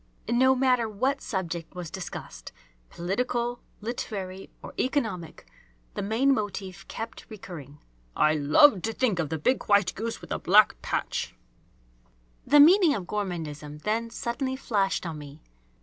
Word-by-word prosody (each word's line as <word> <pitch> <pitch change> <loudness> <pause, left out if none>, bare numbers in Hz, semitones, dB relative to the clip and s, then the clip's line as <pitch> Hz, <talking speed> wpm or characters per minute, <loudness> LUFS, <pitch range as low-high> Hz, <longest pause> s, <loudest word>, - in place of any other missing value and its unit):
No 260 +3 +4
matter 250 -3 +2
what 260 +7 -1
subject 175 -6 -4
was 175 -3 -6
discussed, 120 - -7 0.4
political, 240 +6 -2 0.2
literary, 195 -4 -5
or - - -8
economic, 220 - -2 0.5
the - - -3
main 230 +7 +2
motif 195 -4 -4
kept 225 +1 -7
recurring: 165 - -9 0.4
"I 155 - +4
love 155 - +5
to 225 +3 -2
think 220 -7 +1
of 155 -4 -1
the 160 - -2
big 250 - +1
white 200 -3 +3
goose 225 +2 -4
with - - -13
the - - -1
black 205 +4 +5
patch!" - - -2 1.1
The 295 +2 +6
meaning 335 +1 +7
of 195 -5 -4
gourmandism 155 -7 -5
then 225 +2 -1
suddenly 250 +3 -3
flashed 200 -8 0
on 160 -3 -5
me. 145 +1 -11
205 Hz, 140 wpm, -27 LUFS, 175-240 Hz, 1.1 s, meaning